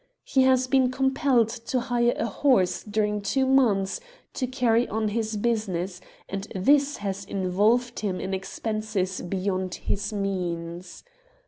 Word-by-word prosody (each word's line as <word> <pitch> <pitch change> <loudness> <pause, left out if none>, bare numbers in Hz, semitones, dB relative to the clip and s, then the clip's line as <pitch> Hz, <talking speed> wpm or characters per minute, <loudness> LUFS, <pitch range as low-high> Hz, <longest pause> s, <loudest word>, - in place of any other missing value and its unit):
He 265 - +2
has 260 -1 +4
been 260 -1 +3
compelled 265 -2 +2
to 240 +2 -2
hire 240 -1 +1
a - - 0
horse 195 -6 +2
during 210 0 -1
two 265 +7 +1
months 230 -8 +2 0.3
to 255 - -2
carry 245 -2 +2
on 220 0 -1
his 220 0 -2
business, 195 -5 -1 0.3
and 195 +1 -5
this 280 +9 +3
has 200 -1 -4
in 190 -2 -3
volved 235 +6 +2
him 195 -4 -2
in 190 - -3
expenses 200 -1 -3
beyond 185 0 -2
his 205 +2 -3
means. 180 -3 -4
215 Hz, 140 wpm, -26 LUFS, 190-245 Hz, 0.3 s, has